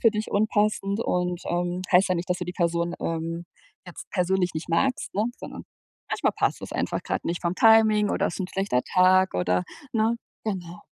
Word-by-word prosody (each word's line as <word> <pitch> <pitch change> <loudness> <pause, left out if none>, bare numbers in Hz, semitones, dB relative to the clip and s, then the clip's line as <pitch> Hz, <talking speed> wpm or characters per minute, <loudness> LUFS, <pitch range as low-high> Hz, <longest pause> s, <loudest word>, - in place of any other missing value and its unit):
für 230 - +5
dich 215 0 -3
unpassend 205 -1 +1
und, 180 -4 -1
ähm, 175 +1 -1
heißt 185 +2 +5
ja 185 - +2
nicht, 175 +1 -3
dass 180 - +1
du 180 - -3
die 180 - -5
Person, 170 -1 0
ähm, 165 +1 -3 0.4
jetzt 180 - -10
persönlich 180 -1 +1
nicht 155 +2 -5
magst, 250 +10 0
ne, 210 +3 +1
sondern - - -8 0.5
manchmal - - 0
passt - - 0
es - - -7
einfach - - -2
grad - - -3
nicht 170 +1 -2
vom 170 +1 0
Timing 220 -1 +5
oder - - +1
es - - -3
ist - - -6
'n 185 - -2
schlechter 195 -10 0
Tag 185 +1 +4
oder, 90 0 +1 0.3
ne? 225 +1 +2 0.3
Genau. 180 -5 -5
180 Hz, 195 wpm, -25 LUFS, 170-210 Hz, 0.5 s, für